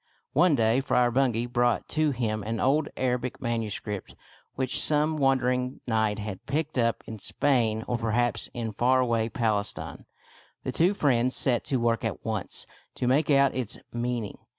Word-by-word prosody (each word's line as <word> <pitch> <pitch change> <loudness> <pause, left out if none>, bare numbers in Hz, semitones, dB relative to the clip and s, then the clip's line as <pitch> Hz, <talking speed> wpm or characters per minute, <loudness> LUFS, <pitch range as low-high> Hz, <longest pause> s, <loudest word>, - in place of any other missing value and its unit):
One 175 -4 +4
day 115 0 +3
Friar 125 -3 +2
Bungay 120 -2 +1
brought 120 -1 +1
to 155 0 +1
him 115 -5 -1
an 110 +2 -3
old 145 +3 +2
Arabic 125 0 -1
manuscript 110 -4 -4 0.4
which 130 -1 0
some 155 +1 +2
wandering 125 -2 +1
knight 110 -3 +1
had 105 -3 -6
picked 150 0 -1
up 115 -1 +1
in 110 -1 -8
Spain 115 -3 +1
or 120 - -1
perhaps 115 +1 0
in 115 -2 -3
far 125 +5 +2
away 115 -3 +1
Palestine. 110 -3 -2 0.6
The - - -2
two 180 +5 +2
friends 130 -6 +2
set 125 -3 +3
to 135 - +1
work 115 -1 0
at 110 -3 -4
once 110 -4 -3 0.3
to - - -2
make 145 +5 +2
out 140 -1 +4
its 125 -4 -2 0.2
mean 120 -1 -2
ing. - - -9
120 Hz, 165 wpm, -27 LUFS, 115-135 Hz, 0.6 s, One